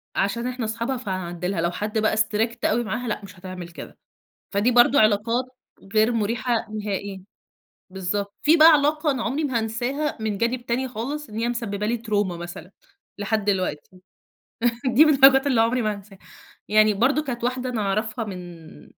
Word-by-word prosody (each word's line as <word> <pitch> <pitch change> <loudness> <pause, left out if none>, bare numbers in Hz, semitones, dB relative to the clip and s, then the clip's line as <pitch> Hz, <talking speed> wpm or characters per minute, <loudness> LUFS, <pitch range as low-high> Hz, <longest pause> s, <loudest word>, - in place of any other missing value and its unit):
عشان 235 +5 0
إحنا 250 -2 -3
أصحابها 230 +4 -2
فهنعدي 185 -6 -4
لها، 185 -3 -1
لو 170 +1 0
حد 210 +4 -3
بقى 215 0 +1
Strict 220 +2 0
أوي 235 +3 +2
معاها، 235 +2 -4
لأ، 210 - -2
مش 195 -2 -12
هتعمل 185 -2 -8
كده. 170 - -11 0.5
فدي 205 +5 +2
برضه 245 +3 +5
علاقات 220 +4 +2 0.5
غير 220 +2 +4
مريحة 230 +2 -1
نهائيًا، 200 -2 -4 0.7
بالضبط. 195 +2 -3
في 315 +3 +5
بقى 315 +1 +9
علاقة 300 +1 +2
أنا 255 -4 -2
عمري 275 +7 -1
ما 260 -5 0
هانساها 245 +7 -2
من 215 -2 -2
جانب 240 +2 -1
تاني 255 +3 -1
خالص، 265 +4 -5
إن 215 - -8
هي 235 +1 0
مسببة 210 -4 -3
لي 235 +2 0
تروما 205 -6 -1
مثلًا، 175 +1 -9 0.5
لحد 205 0 -1
دلوقتي 185 -7 -1 1.0
دي 255 +5 +6
من 305 - +5
الحاجات 270 +1 +6
اللي 250 -5 +3
عمري 235 +2 +1
ما 215 -1 0
هانساها. 200 -1 -13 0.5
يعني 215 0 +4
برضه 270 +9 +2
كانت 240 -4 -5
واحدة 255 +1 -1
أنا 230 -4 -2
أعرفها 215 +3 -1
من 175 -5 -10
220 Hz, 175 wpm, -23 LUFS, 200-245 Hz, 1.0 s, بقى